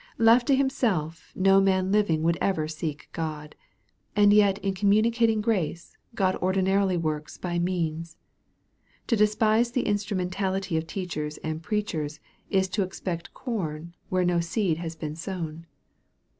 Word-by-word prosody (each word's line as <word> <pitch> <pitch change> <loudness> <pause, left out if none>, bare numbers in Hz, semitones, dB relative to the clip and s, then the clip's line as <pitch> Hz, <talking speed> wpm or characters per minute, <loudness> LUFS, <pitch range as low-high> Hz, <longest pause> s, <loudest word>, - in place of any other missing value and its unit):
Left 230 +1 +5
to 275 - +5
himself, 215 - -1
no 195 +1 +5
man 190 -1 +2
living 200 -7 +2
would 170 +1 +3
ever 160 -6 +1
seek 155 -1 -5
God. 150 -2 -5 0.6
And 205 -1 +6
yet 200 -2 +5
in 195 - +1
communicating 220 +3 +3
grace, 185 -6 -2 0.2
God 185 -3 +2
ordinarily 190 0 +1
works 155 -2 -3
by 175 -1 -2
means. 165 -2 -2 0.9
To 235 - +2
despise 215 +2 +3
the 250 - 0
instrumentality 195 -2 -1
of 160 0 -1
teachers 155 -5 -4
and 160 0 -3
preachers, 160 -6 -3 0.3
is 190 -1 +2
to 200 +3 -1
expect 180 -2 -4
corn 170 - -4 0.2
where 185 -1 +1
no 175 -1 +2
seed 170 0 0
has 165 -1 -5
been 155 -1 -5
sown. 165 -2 -6
185 Hz, 140 wpm, -26 LUFS, 165-205 Hz, 0.9 s, And